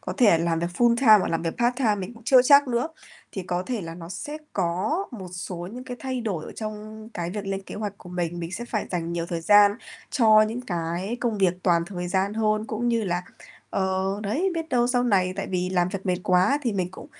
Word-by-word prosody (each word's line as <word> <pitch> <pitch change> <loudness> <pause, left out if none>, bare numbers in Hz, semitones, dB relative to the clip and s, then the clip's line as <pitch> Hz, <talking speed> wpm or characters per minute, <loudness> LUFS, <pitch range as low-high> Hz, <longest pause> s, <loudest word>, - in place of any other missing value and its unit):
có - - -5
thể 220 - +5
làm 165 0 0
việc 170 - -1
full-time 235 -2 +6
hoặc - - -1
làm 165 0 -1
việc 165 - -3
part-time, 240 -3 +1
mình 190 +6 -6
cũng 230 - -15
chưa 255 0 +6
chắc 280 +1 +6
nữa, 240 +4 0 0.4
thì 190 - -4
có 180 0 -2
thể 240 +1 -3
là 165 -2 -7
nó 165 -1 -9
sẽ 290 - -6
có 195 - 0
một 190 -7 -8
số 180 0 -5 0.2
những 250 +2 -8
cái 250 -1 -6
thay 260 -2 -3
đổi 195 -9 -3
ở - - -9
trong 215 0 -7
cái 170 0 -3
việc 205 +1 -5
lên 195 0 -3
kế - - -9
hoạch 205 -1 -5
của 180 - -13
mình. 175 -1 -3
Mình 165 +1 -5
sẽ 235 +5 -4
phải 220 -3 -3
dành 170 -2 -2
nhiều 170 0 -2
thời 170 -1 -3
gian 205 +3 +6 0.4
cho 215 -3 +6
những 225 +3 -2
cái 175 +2 -3
công 230 -4 -1
việc 185 -2 +3
toàn 170 -2 +3
thời 180 -2 -5
gian 190 +3 0
hơn, 215 -1 +1
cũng 230 +2 -2
như 230 -2 +1
là 175 -1 -1 0.5
ờ, 190 +1 -1
đấy, 285 - 0
biết 325 -1 -3
đâu 240 -2 +2
sau 245 0 +2
này 185 -5 +2
tại 195 - -3
vì 180 0 -1
làm 180 -1 +2
việc 195 +1 -6
mệt 180 - +2
quá 185 +10 +3
thì 235 - 0
mình 185 -2 -1
cũng - - -11
200 Hz, 245 wpm, -25 LUFS, 180-235 Hz, 0.5 s, full-time